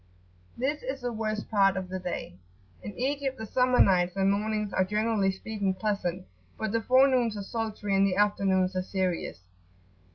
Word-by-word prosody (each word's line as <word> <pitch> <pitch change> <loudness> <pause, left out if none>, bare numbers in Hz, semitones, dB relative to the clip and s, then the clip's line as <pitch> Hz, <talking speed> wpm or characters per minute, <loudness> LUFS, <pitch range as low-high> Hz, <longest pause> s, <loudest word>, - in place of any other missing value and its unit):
This 275 +5 -1
is 265 +1 -5
the 245 -1 -3
worst 215 -1 -3
part 195 -2 +4
of 190 -1 -3
the 185 +1 -4
day. 180 - -5 0.5
In 205 - -8
Egypt 270 +1 -1
the 220 - -6
summer 250 +3 +2
nights 180 -1 +4
and 195 0 +2
mornings 210 0 -1
are, 185 - +3
generally 210 0 +1
speaking, 195 -1 -3
[p.78]pleasant, 185 -3 -2 0.3
but 220 -2 -2
the 230 +1 0
forenoons 255 -3 +3
are 200 - -4
sultry, 215 -2 -3
and 195 0 +4
the 185 - 0
afternoons 195 -2 +2
are 185 - +1
serious. 185 - -2
205 Hz, 170 wpm, -28 LUFS, 190-230 Hz, 0.5 s, part